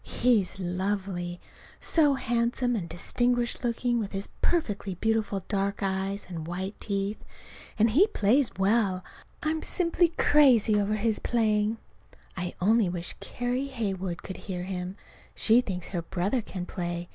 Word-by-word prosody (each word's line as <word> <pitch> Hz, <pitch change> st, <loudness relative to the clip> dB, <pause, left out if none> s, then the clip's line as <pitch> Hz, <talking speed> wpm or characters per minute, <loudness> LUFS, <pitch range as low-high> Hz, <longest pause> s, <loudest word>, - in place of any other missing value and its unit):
He's 220 Hz, -7 st, +1 dB
lovely: 180 Hz, -1 st, -2 dB, 0.4 s
so 295 Hz, -4 st, +3 dB
handsome 240 Hz, 0 st, 0 dB
and 175 Hz, -6 st, -3 dB
distinguished 245 Hz, +9 st, 0 dB
looking 240 Hz, 0 st, 0 dB
with 210 Hz, -2 st, -4 dB
his 195 Hz, +1 st, -2 dB
perfectly 205 Hz, -, 0 dB
beautiful 215 Hz, -1 st, 0 dB
dark 200 Hz, -1 st, -1 dB
eyes 195 Hz, +1 st, -1 dB
and 165 Hz, -3 st, -6 dB
white 190 Hz, +3 st, -3 dB
teeth. 200 Hz, 0 st, -2 dB, 0.5 s
And 220 Hz, +1 st, +4 dB
he 345 Hz, -, +5 dB
plays 260 Hz, -, +3 dB
well, 195 Hz, -2 st, +2 dB, 0.4 s
I'm 315 Hz, 0 st, 0 dB
simply 345 Hz, 0 st, +2 dB
crazy 275 Hz, -9 st, +5 dB
over 205 Hz, +1 st, 0 dB
his 215 Hz, 0 st, 0 dB
playing. 215 Hz, -2 st, +1 dB, 0.6 s
I 180 Hz, 0 st, -4 dB
only 215 Hz, +1 st, +3 dB
wish 175 Hz, -1 st, -4 dB
Carrie 250 Hz, +2 st, -2 dB
Heywood 195 Hz, -9 st, -3 dB
could 190 Hz, -, -6 dB
hear 180 Hz, -3 st, -5 dB
him. 185 Hz, 0 st, -4 dB, 0.4 s
She 230 Hz, +2 st, +5 dB
thinks 180 Hz, -7 st, -4 dB
her 175 Hz, -3 st, -2 dB
brother 190 Hz, +8 st, -1 dB
can 185 Hz, -4 st, -6 dB
play. 175 Hz, -1 st, -4 dB
205 Hz, 140 wpm, -28 LUFS, 185-240 Hz, 0.6 s, he